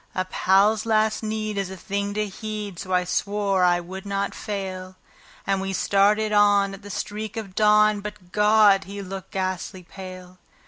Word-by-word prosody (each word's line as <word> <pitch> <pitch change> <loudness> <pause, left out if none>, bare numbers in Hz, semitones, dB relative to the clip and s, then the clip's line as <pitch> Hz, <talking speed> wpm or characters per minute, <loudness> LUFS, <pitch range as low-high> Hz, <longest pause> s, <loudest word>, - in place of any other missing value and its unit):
A 185 - 0
pal's 205 +4 +2
last 215 -1 +2
need 215 -1 -3
is 195 -2 -2
a 190 - -8
thing 200 +2 -3
to 215 0 0
heed, 210 -2 -6
so 185 - -7
I 180 0 +3
swore 200 +1 0
I 175 -1 +4
would 185 +2 -8
not 200 0 -2
fail; 190 -2 -5 0.5
And 195 -1 0
we 195 0 -3
started 210 +3 +2
on 205 -1 +4
at 195 - -10
the 205 - -11
streak 210 +2 -5
of 205 -4 -6
dawn; 210 0 +4
but 205 -3 -9
God! 210 -2 +5
he 200 +1 -7
looked 190 0 -7
ghastly 185 0 -3
pale. 185 0 -11
200 Hz, 175 wpm, -24 LUFS, 190-210 Hz, 0.5 s, God